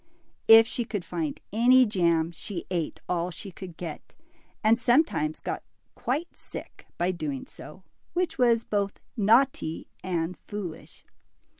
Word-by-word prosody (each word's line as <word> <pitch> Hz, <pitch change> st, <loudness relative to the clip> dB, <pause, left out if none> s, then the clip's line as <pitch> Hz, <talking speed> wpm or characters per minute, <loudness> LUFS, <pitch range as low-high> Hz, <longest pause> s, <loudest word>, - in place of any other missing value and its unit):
If 225 Hz, 0 st, +10 dB
she 240 Hz, -, -2 dB
could 205 Hz, -5 st, -4 dB
find 165 Hz, -3 st, -3 dB
any 250 Hz, +3 st, +6 dB
jam, 170 Hz, -6 st, +2 dB
she 175 Hz, +2 st, -6 dB
ate 170 Hz, -4 st, -2 dB
all 175 Hz, 0 st, 0 dB
she 195 Hz, +3 st, -9 dB
could 175 Hz, -2 st, -10 dB
get, 165 Hz, -4 st, -7 dB, 0.5 s
and 225 Hz, +2 st, +5 dB
sometimes 240 Hz, -, +2 dB
got -, -, -4 dB, 0.3 s
quite 295 Hz, +8 st, -3 dB
sick -, -, -10 dB
by 175 Hz, +2 st, +1 dB
doing 150 Hz, -6 st, -4 dB
so, 185 Hz, +5 st, -12 dB, 0.3 s
which 355 Hz, -5 st, -1 dB
was 235 Hz, -2 st, +4 dB
both 200 Hz, -1 st, -1 dB, 0.2 s
naughty 225 Hz, -5 st, +3 dB, 0.2 s
and 175 Hz, -1 st, -2 dB
foolish. 195 Hz, -6 st, -7 dB
195 Hz, 135 wpm, -27 LUFS, 170-230 Hz, 0.5 s, If